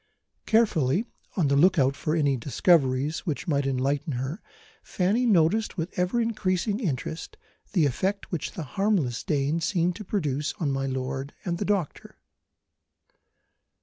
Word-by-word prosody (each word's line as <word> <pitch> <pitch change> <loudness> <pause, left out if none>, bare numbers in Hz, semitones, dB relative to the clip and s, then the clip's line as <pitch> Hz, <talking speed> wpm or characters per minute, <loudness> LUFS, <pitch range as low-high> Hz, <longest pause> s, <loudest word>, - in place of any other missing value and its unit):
Carefully 205 - +3 0.3
on 165 -6 +3
the 140 - +2
look 180 +6 +5
out 135 -1 +3
for 155 +2 -1
any 145 -4 +2
discoveries 140 +2 +2
which 155 -5 -4
might 140 -3 +1
enlighten 135 +3 0
her, 130 - -4 0.4
Fanny 210 +7 +1
noticed 205 +2 +2
with 165 +1 -3
ever 180 +6 +1
increasing 210 -2 0
interest 160 - -4 0.4
the 170 -7 +4
effect 190 +9 -1
which 170 -5 -3
the 165 - -5
harmless 160 - 0
Dane 150 +2 0
seemed 175 0 +1
to 215 - -7
produce 150 -8 -1
on 150 -6 0
my 135 0 -1
lord 135 +1 -4
and 170 -2 -2
the 205 - -1
doctor. 195 -7 -2
160 Hz, 145 wpm, -26 LUFS, 140-190 Hz, 0.4 s, look